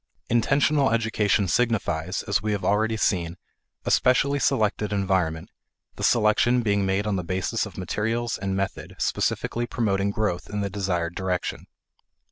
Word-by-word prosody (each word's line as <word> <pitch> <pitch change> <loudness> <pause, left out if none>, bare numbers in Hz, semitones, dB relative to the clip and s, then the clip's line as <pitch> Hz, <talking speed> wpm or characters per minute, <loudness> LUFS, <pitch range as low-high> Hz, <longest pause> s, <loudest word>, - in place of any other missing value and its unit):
Intentional 140 +4 +3
education 110 -3 +1
signifies, 95 -6 0
as 100 -1 0
we 105 0 -1
have 100 -3 -3
already 110 +3 +2
seen, 85 -4 0 0.5
a - - 0
specially 140 +3 +3
selected 105 -4 +1
environment, 95 -5 0 0.4
the - - -7
selection 120 +2 +3
being 100 -2 +1
made 95 +2 0
on 105 -2 0
the 90 - -3
basis 95 +6 -1
of 100 - -13
materials 115 +5 -1
and 95 0 -3
method 95 0 -4
specifically 120 0 -1
promoting 100 -4 0
growth 100 -4 -2
in 105 0 -3
the 100 -1 -2
desired 90 -4 -1
direction. 95 -1 -3
105 Hz, 145 wpm, -25 LUFS, 95-115 Hz, 0.5 s, Intentional